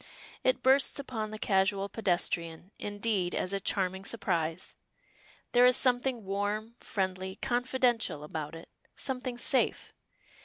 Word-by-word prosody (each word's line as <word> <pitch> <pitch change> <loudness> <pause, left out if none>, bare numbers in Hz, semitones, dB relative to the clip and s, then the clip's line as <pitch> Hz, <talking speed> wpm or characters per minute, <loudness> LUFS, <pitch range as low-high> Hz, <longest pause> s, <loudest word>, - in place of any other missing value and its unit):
It 255 - +2
bursts 265 +1 +4
upon 235 -6 -4
the 215 - -6
casual 195 -1 +1
pedestrian, 175 -3 -1
indeed, 205 -3 -1
as 185 - -1
a 195 - 0
charming 190 -1 -1
surprise. 175 -6 -2 0.8
There 245 +1 +7
is 250 +1 +5
something 250 -3 +2
warm, 205 +3 -2
friendly, 190 -1 -2
confidential 245 - 0
about 150 0 -5
it 165 - -11 0.3
something 255 -2 -3
safe. 260 +2 +1
205 Hz, 120 wpm, -30 LUFS, 185-245 Hz, 0.8 s, There